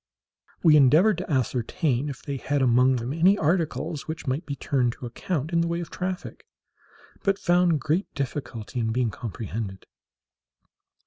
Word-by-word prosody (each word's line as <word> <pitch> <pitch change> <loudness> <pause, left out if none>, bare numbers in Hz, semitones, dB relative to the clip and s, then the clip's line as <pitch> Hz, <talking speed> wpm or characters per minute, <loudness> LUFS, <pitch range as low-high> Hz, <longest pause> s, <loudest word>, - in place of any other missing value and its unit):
We 155 -3 +7
endeavoured 160 +8 +5
to 185 - -6
ascertain 130 - 0
if 135 - -8
they 140 -2 -4
had 140 +1 0
among 125 +1 +4
them 120 +2 -3
any 180 +5 +4
articles 160 -2 -1
which 160 -1 -5
might 140 +5 -2
be 140 - -3
turned 125 -3 0
to 125 - -9
account 150 +6 -3
in 170 - +3
the 170 - 0
way 170 0 -1
of 170 - -6
traffic, 185 +1 -5 0.7
but 195 -1 +1
found 175 -4 +3
great 165 +8 -1
difficulty 130 -4 -4
in 110 -1 0
being 120 -1 0
comprehended. 105 -3 -6
145 Hz, 155 wpm, -25 LUFS, 125-170 Hz, 0.7 s, We